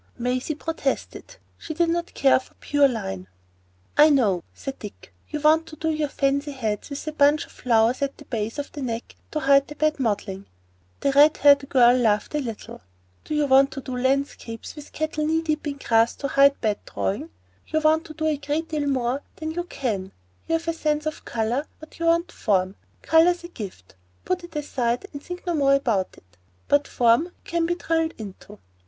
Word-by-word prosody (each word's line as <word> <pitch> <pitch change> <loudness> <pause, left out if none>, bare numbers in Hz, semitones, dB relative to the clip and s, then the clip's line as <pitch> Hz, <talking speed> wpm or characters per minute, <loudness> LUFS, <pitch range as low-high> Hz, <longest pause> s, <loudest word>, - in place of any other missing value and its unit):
Maisie 250 +5 -1
protested; 320 - -4 0.2
she 315 - -6
did 340 +1 +2
not 340 +1 -2
care 270 -1 +4
for 260 - -18
the - - -38
pure 290 -1 +3
line. 95 - -4 0.7
"I 300 +1 +7
know," 210 - +2
said 270 -1 -7
Dick. 210 -1 -11 0.2
"You 300 - -3
want 315 +2 +4
to 310 - -10
do 320 +1 -1
your 305 -1 0
fancy 280 +1 0
heads 220 -4 -3
with 280 +1 -6
a 310 - -3
bunch 295 0 +3
of - - -19
flowers 230 +1 +2
at 280 0 -2
the 290 - -13
base 225 -1 -3
of 290 - -5
the 290 - -7
neck 235 -2 -4
to 305 - -3
hide 275 0 +4
bad 310 -1 +1
modelling." 200 -5 -2 0.5
The 280 - +2
red 290 +3 +6
haired 280 -1 +5
girl 245 -2 +6
laughed 220 -3 +1
a 300 - +1
little. 230 -6 -7 0.5
"You 300 -1 +1
want 275 0 +5
to 275 - -6
do 255 -1 -6
landscapes 260 -3 -2
with 295 -1 -11
cattle 310 -1 -2
knee 320 +1 +1
deep 310 -1 -2
in 285 -1 -3
grass 230 -3 +2
to 280 - -4
hide 280 +1 +5
bad 215 -3 0
drawing. 275 +12 -2 0.4
You 315 - 0
want 315 +1 +3
to 310 - -10
do 315 0 -3
a 310 -2 +1
great 295 +3 -3
deal 300 -2 -1
more 260 0 0
than 315 -1 -4
you 350 +2 -3
can 225 - -3
do. 190 - -16 0.4
You 330 - +2
have 330 0 -3
sense 300 -1 -1
of 310 - -4
colour, 235 +6 -1
but 315 +1 -14
you 335 - 0
want 335 +1 +2
form. 190 -3 0 0.3
Colour's 345 +2 +4
a 345 - -8
gift,—put 95 - -7
it 345 -2 -12
aside 255 -1 -1
and 285 - -7
think 355 +4 -8
no 350 - 0
more 275 -3 +4
about 225 -9 0
it,—but 90 - -3
form 240 +4 +3
you 360 - -13
can 335 0 -1
be 345 - 0
drilled 325 -1 -1
into. 200 -4 -10
280 Hz, 200 wpm, -24 LUFS, 235-310 Hz, 0.7 s, I